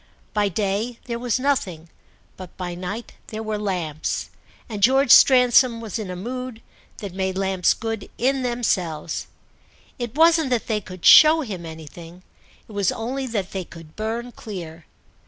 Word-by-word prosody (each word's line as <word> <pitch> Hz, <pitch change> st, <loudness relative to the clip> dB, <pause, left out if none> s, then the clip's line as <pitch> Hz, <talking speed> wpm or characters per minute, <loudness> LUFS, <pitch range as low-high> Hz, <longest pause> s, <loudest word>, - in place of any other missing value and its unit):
By 210 Hz, -1 st, +1 dB
day 210 Hz, +5 st, -2 dB
there 235 Hz, -2 st, -4 dB
was 245 Hz, 0 st, 0 dB
nothing, 200 Hz, -, -1 dB, 0.5 s
but 185 Hz, -2 st, -11 dB
by 180 Hz, -1 st, -4 dB
night 185 Hz, +6 st, -6 dB
there 220 Hz, 0 st, -6 dB
were 215 Hz, -1 st, -3 dB
lamps, 175 Hz, -7 st, -3 dB, 0.4 s
and 210 Hz, -3 st, -6 dB
George 260 Hz, +3 st, +4 dB
Stransom 250 Hz, -2 st, +6 dB
was 225 Hz, -1 st, -5 dB
in 210 Hz, -4 st, -5 dB
a 180 Hz, -, -5 dB
mood 245 Hz, +4 st, -6 dB, 0.3 s
that 200 Hz, -5 st, -7 dB
made 190 Hz, 0 st, -2 dB
lamps 190 Hz, -2 st, +1 dB
good 225 Hz, -2 st, -5 dB
in 265 Hz, +2 st, +1 dB
themselves. 185 Hz, -11 st, -2 dB, 0.7 s
It 240 Hz, 0 st, -5 dB
wasn't 325 Hz, -2 st, +4 dB
that 245 Hz, -3 st, 0 dB
they 215 Hz, -2 st, -1 dB
could 185 Hz, -2 st, -10 dB
show 310 Hz, +1 st, +8 dB
him 190 Hz, -, -6 dB
anything, 165 Hz, +2 st, -11 dB, 0.4 s
it -, -, -14 dB
was 200 Hz, -3 st, +1 dB
only 260 Hz, +4 st, -4 dB
that 205 Hz, -6 st, -3 dB
they 190 Hz, -1 st, -3 dB
could 165 Hz, -2 st, -14 dB
burn 230 Hz, +3 st, -4 dB
clear. 170 Hz, -8 st, -9 dB
215 Hz, 155 wpm, -23 LUFS, 185-245 Hz, 0.7 s, show